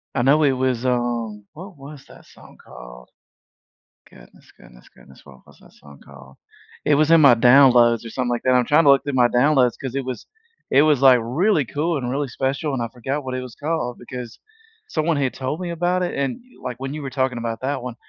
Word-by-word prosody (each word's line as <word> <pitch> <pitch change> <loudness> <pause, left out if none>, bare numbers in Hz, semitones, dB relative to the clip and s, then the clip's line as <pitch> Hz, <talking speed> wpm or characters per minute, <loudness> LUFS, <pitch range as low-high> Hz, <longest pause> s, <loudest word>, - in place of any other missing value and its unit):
I 125 - 0
know 145 +4 +3
it 140 - +3
was, 130 -1 -2
um 120 -4 -2
What 180 +4 -12
was 140 0 -12
that - - -17
song - - -18
called? - - -13 1.0
Goodness, - - -20
goodness, - - -18
goodness. 65 - -19
What 65 -2 -17
was - - -20
that - - -20
song 70 -1 -17
called? 70 -1 -16 0.5
It 150 - +3
was 155 +2 +2
in 165 -1 +6
my 140 -5 +7
downloads 120 -1 +5
or - - -7
something 125 +1 -3
like 120 -1 -2
that. 130 - +2
I'm 125 -1 +2
trying 150 +5 +3
to - - +6
look 140 - +3
through 145 - -4
my 125 -2 +4
downloads, 125 0 +2
'cause 130 -1 -6
it 135 -1 -3
was 130 -1 -6 0.5
it 140 +2 +6
was, 150 -4 +2
like, 130 -2 +6
really 150 - 0
cool 155 +6 -2
and 125 -3 -4
really 140 +1 -3
special, 135 +4 -3
and 130 - -3
I 115 - -2
forgot 130 +4 -4
what 130 - -5
it 130 - -4
was 125 -4 -10
called, 150 -5 -3
because 120 -1 -9 0.5
someone 165 - -1
had 135 -3 -1
told 130 +4 -4
me 180 -1 -5
about 175 +2 -1
it, 180 - -3
and, 140 - -2
y 250 - -23
like, 120 - -9
when 135 +1 -5
you 155 - -6
were 140 - -6
talking 130 -1 -2
about 115 -1 -4
that 135 -1 -3
one, 125 -2 -7
130 Hz, 230 wpm, -21 LUFS, 120-145 Hz, 1.0 s, my